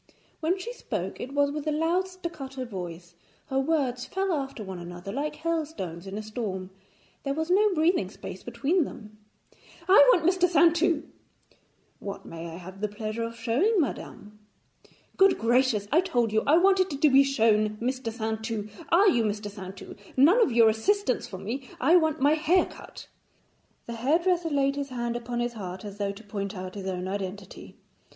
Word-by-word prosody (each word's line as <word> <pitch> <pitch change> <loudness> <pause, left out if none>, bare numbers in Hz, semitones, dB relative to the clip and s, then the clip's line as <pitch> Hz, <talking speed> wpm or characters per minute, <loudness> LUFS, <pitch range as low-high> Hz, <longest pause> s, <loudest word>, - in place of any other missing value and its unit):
When 335 +4 0
she 465 +6 -6
spoke, - - -5
it 260 - -6
was 285 0 +3
with 300 +1 -5
a - - +2
loud 330 +5 +1
staccato 300 -8 -6
voice; 175 -5 -7 0.4
her 265 -1 +1
words 270 -4 0
fell 385 -1 -1
after 270 -6 -3
one 190 -2 -7
another 175 +2 -7
like 290 +6 -3
hailstones 300 - -3
in 195 +1 -5
a 215 - -4
storm, 200 -4 -5 0.5
there 275 0 -2
was 320 +3 -2
no 415 +3 +4
breathing 315 - +2
space 190 -2 -9
between 275 +10 0
them. 215 -5 -10 0.7
'I 375 - +4 0.2
want 345 -8 +2
Mr. 365 0 +3
Saintou.' 335 0 +3 1.0
'What 200 -1 -7
may 165 0 -7
I 165 - -8
have 185 +2 -11
the 210 - +1
pleasure 215 +2 -5
of 230 0 -4
showing 275 - +2
madame?' 210 -8 -4 0.8
'Good 390 0 +5
gracious, 235 -3 +2
I 325 +5 +5
told 240 - 0
you 220 - +3
I 305 +3 +6
wanted 375 -5 +3
to 305 - +5
be 270 +1 +7
shown 215 -5 +2
Mr. 250 0 -2
Saintou. 220 -1 -3 0.2
Are 375 +5 +5
you 240 - +4
Mr. 205 -1 -3
Saintou? 190 -1 -9 0.2
None 335 - +6
of 360 - +3
your 230 -1 +6
assistants 260 - 0
for 190 - -7
me; 240 +7 -5
I 310 +8 +4
want 315 -3 +3
my 285 +3 +4
hair 320 +4 +3
cut.' - - -12 0.8
The 235 - -6
hairdresser 330 +8 +1
laid 275 -1 +1
his 280 -1 -3
hand 240 -2 -3
upon 240 0 -3
his 240 0 -2
heart, 190 -3 -7
as 205 0 -8
though 200 -1 0
to 200 +3 -12
point 200 -1 -5
out 185 0 -6
his 195 -2 -6
own 185 -1 -3
identity. 195 0 -6
245 Hz, 180 wpm, -27 LUFS, 210-320 Hz, 1.0 s, be